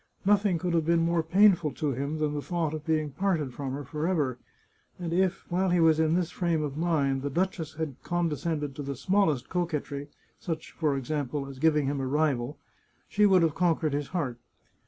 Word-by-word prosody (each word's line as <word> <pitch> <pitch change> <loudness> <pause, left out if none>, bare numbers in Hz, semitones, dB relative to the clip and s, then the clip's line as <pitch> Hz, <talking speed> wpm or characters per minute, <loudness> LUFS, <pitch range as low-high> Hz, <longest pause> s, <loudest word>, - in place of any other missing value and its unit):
Nothing 200 -2 +3
could 175 +1 -2
have 165 -1 +2
been 165 +1 +2
more 170 0 +2
painful 175 -2 +4
to 150 -3 -1
him 140 +4 -3
than 150 -1 0
the 145 - -2
thought 165 -1 -2
of 155 0 -6
being 155 -2 +1
parted 155 -4 -1
from 135 -1 -4
her 145 +1 -4
forever, 150 -3 -1 0.6
and 170 -2 -4
if, 190 +1 +1
while 185 +2 +2
he 175 0 +3
was 160 -1 +5
in 160 +1 +3
this 175 -2 0
frame 170 -3 0
of 140 -2 -4
mind, 145 -5 +1
the 145 - -2
duchess 170 -1 -2
had 155 -4 -4
con 175 0 0
descended 150 -2 -2
to 145 - -5
the 140 -1 -4
smallest 160 -3 +1
coquetry 150 -5 -3 0.2
— - - -39
such, 165 -4 -5
for 150 -4 0
example, 140 +1 -3
as 135 -1 -9
giving 150 -1 +3
him 140 0 -1
a 130 - -2
rival 145 -2 0 0.3
— - - -40
she 210 0 +4
would 185 -3 +5
have 160 -2 +2
conquered 165 -3 +1
his 145 0 -1
heart. 140 -9 -3
155 Hz, 210 wpm, -28 LUFS, 145-175 Hz, 0.6 s, was